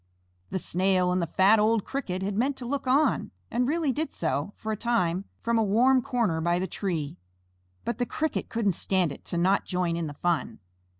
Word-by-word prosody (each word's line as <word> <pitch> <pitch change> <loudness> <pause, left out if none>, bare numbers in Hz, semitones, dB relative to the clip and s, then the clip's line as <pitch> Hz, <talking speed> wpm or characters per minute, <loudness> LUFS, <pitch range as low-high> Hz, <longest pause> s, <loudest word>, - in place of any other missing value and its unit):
The - - -2
Snail 185 0 +1
and 180 0 +1
the 170 - -1
fat, 195 +6 +4
old 215 0 +2
Cricket 190 -9 -3
had 200 +1 -2
meant 265 +5 0
to 250 - -6
look 275 +2 -3
on, 280 +4 +2 0.2
and 245 +1 +1
really 310 -1 +1
did 310 +4 -2
so, 155 +2 -1
for 220 - -4
a - - 0
time, 200 -5 0 0.2
from 230 0 +2
a - - +3
warm 250 +6 +4
corner 235 -11 0
by 170 +1 +2
the 185 - -1
tree, 165 -7 -3 0.7
but 235 - -2
the 245 - 0
Cricket 315 0 -2
couldn't 225 -3 +1
stand 180 -1 0
it - - -10
to 170 - -3
not 190 +3 +3
join 180 -2 -1
in 170 -1 -2
the 145 - -7
fun. 175 +1 -1
200 Hz, 205 wpm, -27 LUFS, 175-240 Hz, 0.7 s, fat